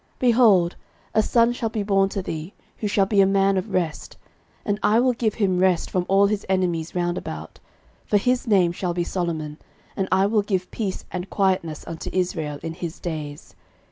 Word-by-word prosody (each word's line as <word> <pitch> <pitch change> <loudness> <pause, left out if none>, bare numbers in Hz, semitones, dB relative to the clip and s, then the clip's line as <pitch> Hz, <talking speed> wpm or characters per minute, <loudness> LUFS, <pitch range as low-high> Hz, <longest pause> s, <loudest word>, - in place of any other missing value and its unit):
13:022:009 - - -39
Behold, 225 -8 +4 0.4
a 220 - +4
son 235 +2 +3
shall 230 -2 -2
be 215 -1 -2
born 195 -1 +2
to 195 -1 -4
thee, 160 +2 -6 0.2
who 210 - -2
shall 200 -1 +2
be 200 0 +3
a 195 - +5
man 195 0 +3
of 190 +3 -2
rest; 170 -5 -2 0.5
and 205 0 -1
I 220 +2 +4
will 250 +1 +3
give 230 -3 -1
him 190 -5 +1
rest 185 -2 +2
from 180 -1 -1
all 195 +1 +5
his 205 0 0
enemies 175 -4 0
round 175 0 0
about: 80 +1 -8 0.5
for 210 - +3
his 250 +4 0
name 190 -5 +4
shall 175 0 -3
be 175 - 0
Solomon, 160 -4 -3 0.4
and 190 - -1
I 190 +1 +4
will 210 +1 +2
give 190 -3 -2
peace 200 -5 -4
and 180 +1 -5
quietness 185 -5 0
unto 165 -1 -6
Israel 165 -5 -2
in 165 0 -4
his 170 -1 -6
days. 150 -4 -6
190 Hz, 200 wpm, -23 LUFS, 175-205 Hz, 0.5 s, a